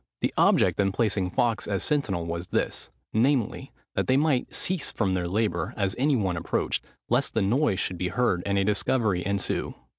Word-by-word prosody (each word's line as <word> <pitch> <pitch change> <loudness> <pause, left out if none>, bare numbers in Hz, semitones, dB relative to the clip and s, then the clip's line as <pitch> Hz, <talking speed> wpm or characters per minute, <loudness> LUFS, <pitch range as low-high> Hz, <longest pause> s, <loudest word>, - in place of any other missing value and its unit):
The - - 0
object - - +3
in 95 -1 +3
placing 100 -3 0
Fawkes 115 +4 0
as 100 -3 -1
sentinel 100 - 0
was 85 +1 -4
this, - - -2 0.2
namely, 120 0 +1 0.2
that - - -1
they 130 - +4
might 145 -4 +1
cease 185 -4 0
from 100 -4 0
their 90 -2 -1
labour 95 -3 -1
as 100 -2 0
any 140 +2 +3
one 95 -7 0
approached, 85 - -1 0.2
lest 125 +2 +1
the 110 - +2
noise 115 0 +2
should 90 -2 -3
be 90 - 0
heard 95 -2 +1
and 100 0 +1
a 100 - +2
discovery 105 -2 +1
ensue. 100 0 -1
100 Hz, 185 wpm, -26 LUFS, 95-125 Hz, 0.2 s, they